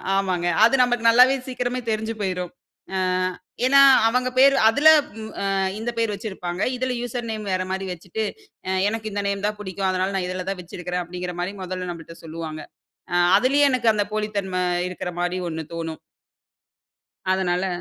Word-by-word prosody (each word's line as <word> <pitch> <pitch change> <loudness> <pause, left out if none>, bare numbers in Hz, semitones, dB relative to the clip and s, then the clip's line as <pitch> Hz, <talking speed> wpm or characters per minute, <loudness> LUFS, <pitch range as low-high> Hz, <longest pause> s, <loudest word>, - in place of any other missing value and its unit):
ஆமாங்க. 185 -3 0 0.2
அது 235 +4 +6
நமக்கு 245 -2 +1
நல்லாவே 250 +3 +7
சீக்கிரமே 250 -1 -3
தெரிஞ்சு 220 +1 -1
போயிரும். 180 -3 -2 0.4
அ - - 0 0.7
ஏன்னா, 275 +2 +6 0.3
அவங்க 250 +2 +1
பேர், 275 +1 +7
அதில 285 +7 +5 0.2
வ் 220 0 -9
அ, - - -1 0.3
இந்த 235 +2 -2
பேர் 225 -2 0
வச்சிருப்பாங்க. 190 -3 -5
இதில 255 0 -1
யூசர் 245 -1 -4
நேம் 215 -2 -5
வேற 185 0 0
மாரி 190 0 -2
வச்சுட்டு, 185 +5 -5 0.7
எனக்கு 220 0 -4
இந்த 200 0 -2
நேம் 200 0 -2
தான் 210 0 -3
புடிக்கும், 190 -1 -2
அதனால 185 +1 0
நான் 185 -2 -1
இதில 185 0 -4
தான் 195 - -3
வச்சிருக்கிறேன் 180 +1 -4
அப்படிங்கிற 180 +1 -6
மாரி 180 +3 -2
மொதல்ல 185 0 -4
நம்மள்ட்ட 165 0 -10
சொல்லுவாங்க. 160 -1 -6 0.5
அ - - +2 0.2
அதுலயே 275 +5 +3
எனக்கு 250 -3 +2
அந்த 205 -1 0
போலித்தன்மை 200 -4 -2 0.3
இருக்கிற 180 0 -5
மாரி 180 +1 -1
ஒண்ணு 160 0 -5
தோணும். 165 -1 -5 1.3
அதனால 185 0 0
195 Hz, 160 wpm, -23 LUFS, 180-230 Hz, 1.3 s, நல்லாவே